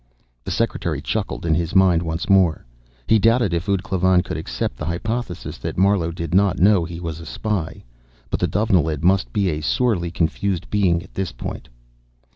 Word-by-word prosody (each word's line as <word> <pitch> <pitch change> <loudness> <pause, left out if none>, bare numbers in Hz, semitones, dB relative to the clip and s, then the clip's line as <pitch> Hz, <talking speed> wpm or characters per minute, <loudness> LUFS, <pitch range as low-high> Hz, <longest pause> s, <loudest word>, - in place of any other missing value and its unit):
The - - -6
secretary 90 -9 -1
chuckled 100 +5 -3
in 80 - +2
his 85 +2 -1
mind 95 -3 +5
once 80 0 -3
more. 95 -8 +3 0.4
He 110 - +4
doubted 115 -3 +3
if 85 +4 -2
ud 100 -1 +1
Klavan 95 -2 +2
could - - -5
accept 65 -6 -3
the 75 - -5
hypothesis 110 +3 -4
that - - -5
Marlowe 95 -3 +3
did 85 -1 -5
not 95 -1 +3
know 95 -1 +4
he 85 0 -7
was 80 -2 -5
a 85 - -9
spy. 100 -5 -3 0.5
But - - -1
the - - +1
Dovenilid 85 -8 +1
must 90 -9 +2
be 100 +4 +1
a 75 -1 -2
sorely 90 0 +1
confused 90 +2 -2
being 90 -5 +2
at - - -18
this 95 -3 -3
point. - - -7
90 Hz, 185 wpm, -21 LUFS, 85-100 Hz, 0.5 s, mind